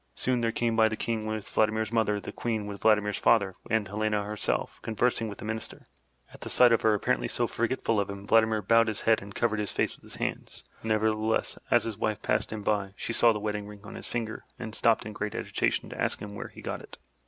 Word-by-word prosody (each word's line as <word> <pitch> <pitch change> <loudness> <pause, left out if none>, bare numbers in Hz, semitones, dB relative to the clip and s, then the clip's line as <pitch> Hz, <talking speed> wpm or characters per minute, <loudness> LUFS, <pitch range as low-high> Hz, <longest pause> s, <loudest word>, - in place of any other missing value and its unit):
Soon 125 -2 +1
there 115 -1 +1
came 115 0 0
by 110 0 +5
the 110 - -2
King 110 -1 -2
with 110 -1 -3
Vladimir's 110 0 +1
mother, 110 -3 +2
the - - -7
Queen 110 -3 -2
with 100 -1 -7
Vladimir's 105 -2 +3
father, 100 -5 +4 0.2
and 110 -2 +1
Helena 105 +1 0
herself, 105 +1 -2
conversing 115 0 0
with 100 - -8
the - - -8
Minister. 110 0 -4 0.5
At - - -10
sight 125 -1 +6
of 115 - +4
her, 110 -1 +4
apparently 65 -11 0
so - - +1
forgetful 115 -2 0
of 100 - -1
him, 100 0 -7
Vladimir 110 -1 +3
bowed 115 +3 +5
his 110 -1 -1
head 115 -1 +3
and 100 0 -10
covered 110 -2 +1
his 105 - -1
face - - 0
with - - -22
his - - -10
hands. - - -4 0.2
Nevertheless, 110 0 0
as - - +4
his 110 -2 -4
wife 110 -3 -1
passed - - 0
him 110 -1 -5
by, 100 -2 0
she 115 - -3
saw 115 0 +6
the 110 - -1
wedding 105 -1 -3
ring 105 -1 -11
on 105 - -9
his - - -7
finger 115 -2 -3
and 110 -3 -6
stopped 115 0 +2
in 110 - -6
great 105 0 -4
agitation - - -1
to - - -5
ask - - +1
him 105 0 -7
where 100 - -6
he - - -13
got - - -4
it. - - -12
110 Hz, 235 wpm, -28 LUFS, 105-115 Hz, 0.5 s, sight